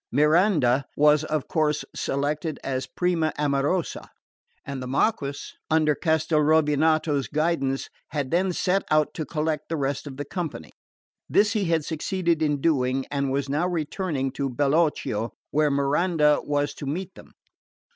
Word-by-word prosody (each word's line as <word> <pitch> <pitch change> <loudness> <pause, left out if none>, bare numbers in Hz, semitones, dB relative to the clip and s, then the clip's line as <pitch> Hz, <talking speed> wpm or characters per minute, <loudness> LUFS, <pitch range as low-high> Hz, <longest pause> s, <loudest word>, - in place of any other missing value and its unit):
Miranda 150 - +3
was 150 0 +5
of 155 -3 -2
course 155 -2 0
selected 145 +3 -2
as 130 -1 -2
prima 170 -3 0
amorosa; 145 +4 -1 0.6
and 140 -2 -5
the 125 - -5
Marquess, 140 - -1 0.2
under 155 -1 +3
Castelrovinato's 155 -1 +2
guidance, 150 -3 0 0.2
had 140 -4 -3
then 185 +2 +2
set 185 +2 +1
out 155 -1 +2
to 155 - -5
collect 155 -1 -2
the 165 - -1
rest 140 +1 -2
of 135 -2 -8
the 145 - -4
company. 155 - -5 0.6
This 210 +1 +3
he 210 -4 0
had 165 -3 +1
succeeded 170 +1 -1
in 145 -2 +1
doing, 135 -4 +1
and 140 -1 -1
was 140 0 -1
now 150 +6 0
returning 160 -4 -2
to 140 +1 -2
Bellocchio, 140 -4 0 0.2
where 150 0 +2
Miranda 150 +2 +2
was 145 0 -1
to 140 - -7
meet 185 +6 -4
them. - - -15
150 Hz, 145 wpm, -25 LUFS, 140-165 Hz, 0.6 s, was